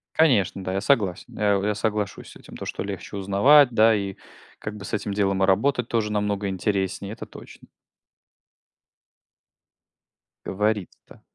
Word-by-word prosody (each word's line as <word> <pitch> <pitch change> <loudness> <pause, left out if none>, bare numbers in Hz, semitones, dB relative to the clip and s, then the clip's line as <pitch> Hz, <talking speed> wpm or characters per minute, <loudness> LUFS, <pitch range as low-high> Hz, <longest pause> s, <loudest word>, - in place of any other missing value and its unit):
Конечно, 110 - +2
да, 95 - -3
я 95 - -1
согласен. 100 -7 0
Э, 100 -1 +2
я 105 0 0
соглашусь 105 -2 -3
с - - -15
этим - - -14
то, - - -7
что - - -4
легче 100 +1 -6
узнавать 120 +9 +5
да, 115 0 +5
и 100 -2 -3 0.4
как 105 - -6
бы 105 -1 -9
с - - -9
этим 105 -1 -2
делом 100 -1 +1
и - - +6
работать 125 +6 +1
тоже 110 -3 -1
намного 105 -1 -1
интереснее, 95 +1 -2
это 115 - -8
точно. - - -14 2.8
Говорит-то. 105 0 -3
105 Hz, 150 wpm, -24 LUFS, 95-110 Hz, 2.8 s, и